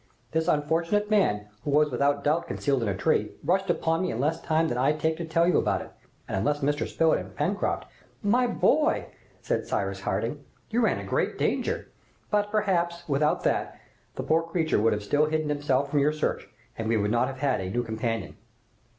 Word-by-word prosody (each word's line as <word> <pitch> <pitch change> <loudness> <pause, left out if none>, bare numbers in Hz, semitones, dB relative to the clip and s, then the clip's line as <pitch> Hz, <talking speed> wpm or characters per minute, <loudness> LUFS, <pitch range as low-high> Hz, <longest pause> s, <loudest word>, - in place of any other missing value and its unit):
This 160 +1 0
unfortunate 165 +7 +1
man, 105 - +2 0.2
who - - -3
was 150 +1 +3
without 140 +3 +1
doubt 160 +3 +1
concealed 140 -3 0
in 115 - 0
a 95 - -2
tree, 105 +1 +1
rushed 190 +5 +1
upon 165 -1 +1
me 185 - 0
in 115 - -4
less 155 +5 0
time 160 +1 +1
than 120 - -2
I 135 +4 +3
take 160 +1 0
to 170 - -4
tell 165 +1 +2
you 180 - +4
about - - 0
it, - - -13 0.4
and - - -3
unless 145 +9 0
Mr. 145 +1 0
Spilett 160 -1 +2
and - - -9
Pencroft 180 +8 -1 0.3
" - - -34 0.2
"My 250 - +3
boy!" 300 +6 +2 0.3
said - - -1
Cyrus - - -2
Harding, - - -2 0.3
"you 235 +2 +2
ran 225 - +2
a - - -5
great - - -1
danger, - - -1 0.4
but, 205 -1 +2
perhaps, 175 -5 0
without 150 +1 +1
that, - - -1 0.4
the - - -4
poor 160 +1 +3
creature 165 -4 0
would 115 - +3
have 105 0 -3
still 145 +8 +2
hidden 155 -1 -1
himself 145 -1 0
from 145 - +3
your 145 +2 +3
search, 155 - -2 0.3
and 110 0 -2
we 115 - +3
should 105 -1 +1
not 120 +1 +2
have 135 - -6
had 135 -8 +1
a 95 - -4
new 120 +5 -1
companion." 115 -2 -3
150 Hz, 210 wpm, -27 LUFS, 135-170 Hz, 0.4 s, you